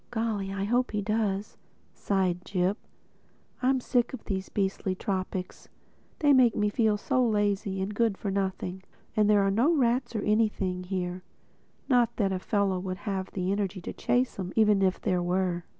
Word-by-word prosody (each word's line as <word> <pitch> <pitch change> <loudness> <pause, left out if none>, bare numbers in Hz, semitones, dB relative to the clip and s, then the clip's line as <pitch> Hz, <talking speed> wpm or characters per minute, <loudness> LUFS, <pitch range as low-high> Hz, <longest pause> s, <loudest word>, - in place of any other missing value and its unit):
"Golly, 220 -4 -2
I 195 0 -3
hope 245 +5 +1
he 210 -1 -2
does!" 210 -1 -1 0.4
sighed 185 -3 0
Jip. 185 +2 0 0.8
"I'm 260 +1 +3
sick 245 0 0
of - - -13
these 190 -2 -3
beastly 195 -1 -1
tropics—they 190 +9 -3
make 255 -3 +5
you 210 0 +1
feel 215 -2 +2
so 255 +4 +1
lazy 205 -3 0
and 200 +2 -4
good 220 -2 +1
for 200 - -3
nothing. 190 -1 -2 0.3
And 210 -1 +3
there 205 -1 +5
are 195 - +2
no 240 +11 +3
rats 245 -2 +1
or 210 - -1
anything 205 -4 0
here—not 185 +6 -3
that 195 -3 +1
a 185 - -2
fellow 195 -1 0
would 185 0 -4
have 190 -2 -3
the 185 0 -1
energy 200 -1 -1
to - - -6
chase 245 -3 0
'em 185 -1 -3
even 210 -3 +4
if 185 -1 +2
there 185 -4 0
were. 175 -1 -1
200 Hz, 165 wpm, -28 LUFS, 190-220 Hz, 0.8 s, make